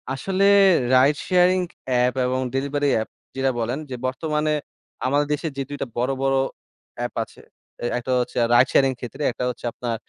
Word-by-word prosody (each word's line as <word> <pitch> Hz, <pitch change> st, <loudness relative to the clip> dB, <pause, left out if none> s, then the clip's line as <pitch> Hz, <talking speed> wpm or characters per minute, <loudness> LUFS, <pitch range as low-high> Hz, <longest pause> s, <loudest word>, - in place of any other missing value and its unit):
আসলে 185 Hz, +9 st, -1 dB, 0.5 s
ride 135 Hz, +3 st, +5 dB
sharing 185 Hz, 0 st, +4 dB, 0.3 s
app 125 Hz, 0 st, +2 dB
এবং 130 Hz, +1 st, 0 dB, 0.2 s
delivery 140 Hz, +2 st, 0 dB
app 110 Hz, -, -1 dB, 0.3 s
যেটা 135 Hz, 0 st, +1 dB
বলেন 120 Hz, +5 st, -2 dB
যে, 130 Hz, -, -4 dB
বর্তমানে 150 Hz, +3 st, -1 dB, 0.5 s
আমাদের 145 Hz, +3 st, +2 dB
দেশে 150 Hz, +3 st, -2 dB
যে -, -, -1 dB
২ 145 Hz, -, -5 dB
টা -, -, -1 dB
বড়, 125 Hz, +3 st, +1 dB
বড় 135 Hz, 0 st, +2 dB, 0.6 s
এ্যাপ -, -, -3 dB
আছে, -, -, -16 dB, 0.4 s
এ -, -, 0 dB
একটা 125 Hz, +1 st, -4 dB
হচ্ছে 125 Hz, -, -3 dB, 0.2 s
রাইড 120 Hz, +2 st, +6 dB
শেয়ারিং 135 Hz, -1 st, +4 dB
ক্ষেত্রে, 125 Hz, +4 st, -8 dB
একটা 120 Hz, -, -5 dB
হচ্ছে 125 Hz, 0 st, -7 dB
আপনার 120 Hz, -1 st, -3 dB
135 Hz, 170 wpm, -23 LUFS, 125-145 Hz, 0.6 s, রাইড